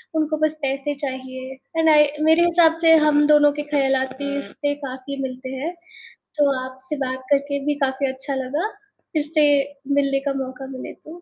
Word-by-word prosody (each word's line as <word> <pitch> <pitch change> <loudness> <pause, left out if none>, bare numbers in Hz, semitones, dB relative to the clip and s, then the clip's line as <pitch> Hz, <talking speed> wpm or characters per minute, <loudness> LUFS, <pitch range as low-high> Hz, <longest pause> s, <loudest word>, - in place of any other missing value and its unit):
उनको 310 0 0
बस 310 - 0
पैसे 275 +1 -1
चाहिए 260 0 -6 0.3
एंड 320 0 +4
आई 300 -1 +6 0.2
मेरे 335 +2 +5
हिसाब 335 -1 +4
से 325 -1 +7
हम 295 0 +4
दोनों 295 -1 +6
के - - -1
ख़यालात 265 -2 +1
भी 280 0 -2
इस - - -8
पे 290 0 +1
काफ़ी 265 +1 -6
मिलते 260 0 -6
हैं, 315 +7 -4 0.7
तो 285 -1 +4
आपसे 260 +3 -7
बात 260 0 -4
करके 280 0 +1
भी 295 - +1
काफ़ी 265 +1 -1
अच्छा 270 +1 -4
लगा, 275 +9 -2 0.5
फिर 305 -2 +1
से 305 0 +1 0.5
मिलने 275 -1 +2
का - - 0
मौका 260 +1 -8
मिले - - -7
तो 335 +3 -13
280 Hz, 180 wpm, -22 LUFS, 265-300 Hz, 0.7 s, से